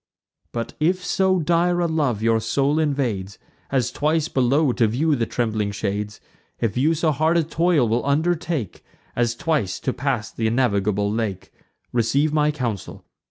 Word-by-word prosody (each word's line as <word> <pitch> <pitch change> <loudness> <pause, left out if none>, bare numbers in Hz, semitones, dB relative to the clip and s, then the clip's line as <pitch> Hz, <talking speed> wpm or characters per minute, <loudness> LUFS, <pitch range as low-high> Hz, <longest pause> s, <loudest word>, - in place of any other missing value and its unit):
But 115 -1 -4
if 180 +4 +1
so 190 +1 +2
dire 175 +1 +2
a 175 - +2
love 145 -10 0
your 115 0 +3
soul 140 +7 +1
invades, 120 -11 -1 0.3
As 130 -4 0
twice 155 +2 0
below 135 +3 +2
to 115 - +2
view 145 +8 +1
the 115 -3 -1
trembling 110 -3 -1
shades; 105 0 -3 0.4
If 110 -3 -1
you 150 +6 +2
so 160 0 +1
hard 155 +4 +2
a 170 - +3
toil 165 -4 +2
will 115 +2 0
undertake, 155 - -1 0.3
As 120 -1 +1
twice 130 - -1
to 130 - -1
pass 130 -5 -2
th' - - -17
innavigable 105 -3 +1
lake; 105 -5 -3 0.4
Receive 135 +6 +1
my 150 -1 +3
counsel. 120 -10 -4
130 Hz, 160 wpm, -22 LUFS, 110-155 Hz, 0.4 s, your